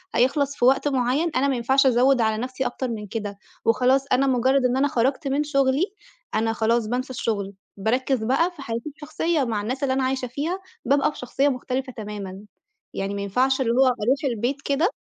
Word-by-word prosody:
هيخلَص 280 +3 +2
في 245 - +2
وقت 270 +3 +4
معين. 270 +4 +1
أنا 265 +2 +2
ما 275 - +1
ينفعش 265 +3 +3
أزوِّد 255 0 +4
على 220 -1 +1
نَفْسي 255 +2 -3
أكتر 255 +1 -2
من 210 -2 -5
كده. 205 -1 -5 0.3
وخلاص، 255 +4 +3
أنا 270 +2 +3
مجرد 260 +1 +2
إن 250 +1 +2
أنا 285 +2 +3
خَرجت 265 +4 0
من 275 +2 +1
شغلي، 275 0 +2 0.5
أنا 225 +1 +1
خلاص 225 0 +1
بانسى 250 +3 -2
الشغل، 200 -5 -2 0.2
باركِّز 250 +4 0
بقى 275 +10 +2
في 290 - -10
حياتي 235 +3 -4
شخصية، 310 0 0
مع 220 -4 -1
الناس 255 +6 -3
اللي 260 -1 +2
أنا 265 - 0
عايشة 260 -1 -1
فيها، 300 +9 -3 0.3
بابقى 280 +3 +3
بشخصية 270 +2 0
مختلفة 255 0 -3
تمامًا. 205 -3 -7 0.5
يعني 195 +1 -3
ما 200 - -3
ينفعش 255 +7 +1
اللي 230 - +1
هو 265 +2 +5
أروح 255 +2 +1
البيت 260 +2 -1
كده، 285 +7 +1
255 Hz, 190 wpm, -24 LUFS, 230-275 Hz, 0.5 s, هو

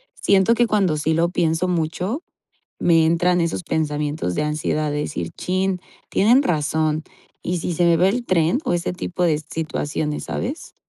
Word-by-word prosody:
siento 200 - +3
que 240 - +3
cuando 195 -8 +1
sí 155 +2 0
lo 165 +2 +2
pienso 170 0 0
mucho, 180 - -2 0.6
me 165 -2 +4
entran 175 +2 +2
esos 165 +1 -1
pensamientos 150 - -1
de - - +1
ansiedad 150 0 -1
de 145 - -1
decir: 85 - -3
"Chin, 185 0 -1 0.3
tienen 240 +7 +4
razón, 155 - 0 0.4
¿y 180 0 -1
si 175 - -3
se 175 - +2
me 170 -1 +5
va 185 +3 +4
el 240 +4 -1
tren?", 170 +5 +2
o - - 0
ese 175 +1 -1
tipo 180 0 -4
de 155 -3 +2
situaciones, 155 -1 -3
¿sabes? 275 +8 -5
170 Hz, 170 wpm, -21 LUFS, 155-185 Hz, 0.6 s, me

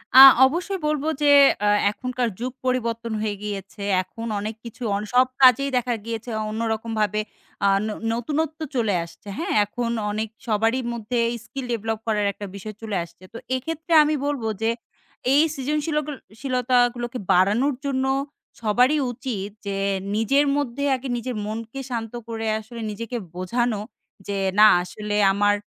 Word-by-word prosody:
আ - - +11 0.3
অবশ্যই 355 +7 -1
বলবো 300 0 -1
যে, 290 -1 +5 0.3
এ - - +3 0.2
এখনকার 250 +2 -2
যুগ 250 +2 -3
পরিবর্তন 235 -2 -1
হয়ে 210 -1 -1
গিয়েছে। 200 0 -6 0.2
এখন 225 +4 -9
অনেক 215 +2 -4
কিছু 235 +2 -8
অন 200 - -1
সব 250 +1 +6 0.2
কাজেই 265 +2 +6
দেখা 245 0 0
গিয়েছে। 230 +1 -5 0.2
অন্যরকমভাবে 220 -1 -1 0.4
আ - - +5 0.2
ন - - -2 0.2
নতুনত্ব 300 +7 -2 0.2
চলে 225 -5 +1
আসছে, 170 +4 -14
হ্যাঁ? 365 +4 -2
এখন 235 +3 -3 0.2
অনেক 215 +2 -2 0.2
সবারই 225 +3 +1
মধ্যে 235 +1 -2 0.3
স্কিল 270 +2 -6
ডেভেলপ 225 -1 -2
করার 210 -2 +1
একটা 205 - -7
বিষয় 210 +2 -7
চলে 220 -3 -4
আসছে। 170 +2 -16
তো - - -6 0.2
এক্ষেত্রে 325 +5 -3
আমি 305 +1 +1
বলব 285 -4 -2 0.2
যে 225 - +2 0.6
এই 285 - +6
সৃজনশীলকল 300 +1 -1 0.3
শিলতাগুলোকে 250 -1 +1
বাড়ানোর 210 +10 +3
জন্য 265 -1 0 0.6
সবারই 245 +7 +3
উচিত। 230 -5 -4 0.2
যে 200 -1 -2 0.4
নিজের 275 +7 +3
মধ্যে 280 -1 -2
আগে 260 +1 -6
নিজের 245 +1 -4
মনকে 225 +4 -5
শান্ত 230 -2 -4
করে 225 -1 -4
আসলে 230 +2 -9
নিজেকে 230 +3 -5 0.2
বোঝানো। 225 +4 -1 0.5
যে 200 -1 -2 0.2
না, 215 - +10 0.2
আসলে 210 +3 -5 0.2
আমার 205 +1 +3
235 Hz, 145 wpm, -23 LUFS, 215-260 Hz, 0.6 s, আ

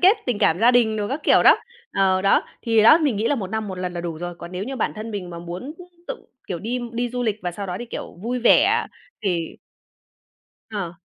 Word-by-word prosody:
kết 380 +5 +6
tình 245 -4 0
cảm 165 - +3
gia 235 +2 +6
đình 230 -3 +3
đồ 205 -1 -2
các 280 +4 -3
kiểu, - - +5
đó. - - +7 0.4
Ờ, 190 -1 +2
đó, 195 - +4 0.2
thì 225 -2 +3
đó, 230 +9 +8
mình 285 -9 +1
nghĩ 220 +3 0
là 290 - +2
1 195 -7 -4
năm 220 -1 -2
1 185 -1 -6
lần 180 -1 -3
là 175 - -3
đủ 170 -2 -4
rồi, 175 0 -5
còn 175 - -9
nếu 185 +2 -3
như 265 +2 -5
bản - - -1
thân 215 +2 -6
mình 195 -4 -5
mà 170 - -7
muốn 175 - -7 0.3
tự, - - -6 0.2
kiểu, 180 - -3
đi 240 +7 -3
đi 240 +1 -1
du 245 0 -2
lịch, 215 -4 0
và 175 - -2
sau 200 +3 -5
đó 180 -1 -4
thì, 240 - -6
kiểu, - - -7
vui 245 +3 -2
vẻ 370 - +4 0.4
thì 175 -5 -2 1.1
Ờ. 195 -6 -4
215 Hz, 250 wpm, -22 LUFS, 180-245 Hz, 1.1 s, đó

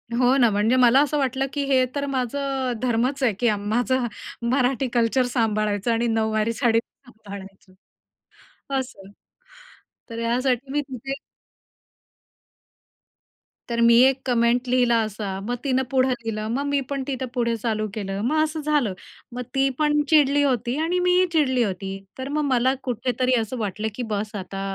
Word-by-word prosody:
हो 250 +2 +3
ना, 240 -3 +5
म्हणजे 210 +5 +2
मला 255 +1 +5
असं 295 +1 -1
वाटलं, 270 -1 0
की 285 -1 -1
हे 260 -2 +3
तर 285 0 -1
माझं 265 0 -2
धर्मच 255 +3 0
आहे, 230 -5 +3
की 240 -2 +3
माझं 240 +4 0 0.5
मराठी 260 0 +1
कल्चर 240 +2 +2
सांभाळायचं 215 -2 0
आणि 235 +1 +1
नऊवारी 220 0 0
साडी 230 -1 +2
सांभाळायची. 200 -7 -13 1.1
असं. 200 -6 -8 1.0
तर 230 0 -6
ह्यासाठी 250 +3 0
मी 295 +1 +1
तिथे 270 -1 -6 2.6
तर 235 0 -1
मी 235 0 +6
एक 270 0 -2
कमेंट 245 0 +2
लिहिला 245 -2 +3
असा. 200 -2 -5
मग 245 +3 -2
तिनं 265 -1 +1
पुढं 260 0 +3
लिहिलं. 225 -3 -3
मग 280 +4 -1
मी 285 0 +1
पण 275 -1 -2
तिथं 260 -1 -3
पुढे 235 -2 0
चालू 215 -1 -2
केलं. 195 -3 -4
मग 310 +4 +2
असं 310 0 -3
झालं, 290 -9 +1 0.4
मग 250 - -3
ती 270 0 +3
पण 295 -1 +3
चिडली 290 -2 +4
होती 245 -2 0
आणि 355 +2 0
मीही 360 +1 +3
चिडली 260 -6 +2
होती. 190 -1 -3 0.3
तर 260 +1 -5
मग 305 - +1
मला 255 +2 +3
कुठेतरी 250 +1 -1
असं 225 +3 -4
वाटलं, 210 0 -3
की 250 - -4
बस, 210 +1 -2
आता 195 0 -5
245 Hz, 155 wpm, -23 LUFS, 225-270 Hz, 2.6 s, मी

